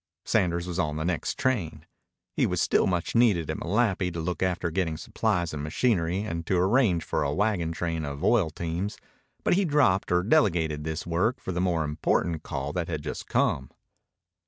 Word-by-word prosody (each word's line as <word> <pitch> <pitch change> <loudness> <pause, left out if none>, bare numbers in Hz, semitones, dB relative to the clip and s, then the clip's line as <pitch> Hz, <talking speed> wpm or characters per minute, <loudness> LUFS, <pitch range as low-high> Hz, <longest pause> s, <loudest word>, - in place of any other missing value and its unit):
Sanders 85 -1 +1
was 90 0 -3
on 75 -4 0
the 80 +1 -2
next 90 -3 -1
train. 85 -11 -1 0.5
He - - +2
was - - -1
still - - +3
much 90 -2 -1
needed 105 -9 +3
at - - -4
Malapi 100 -2 +1
to 85 - -4
look 85 +2 -3
after 90 -2 0
getting 80 -3 -1
supplies 90 -2 -1
and 75 - -4
machinery 90 +1 +1
and 85 -6 -4
to 95 - +2
arrange 95 -2 +3
for - - -1
a 70 - 0
wagon 95 -2 0
train 85 -1 -2
of 70 -1 -5
oil 105 -9 +3
teams, 85 +5 -4 0.5
but - - +3
he 195 +3 +3
dropped 145 - +2
or 90 0 +3
delegated 85 - +2
this 80 0 -3
work 90 +9 0
for - - -5
the 90 0 -1
more 85 -3 +1
important 80 +2 0
call 70 +2 -4
that 90 0 -2
had 80 -4 -4
just 75 - -5
come. 65 -1 +1
85 Hz, 190 wpm, -27 LUFS, 80-95 Hz, 0.5 s, still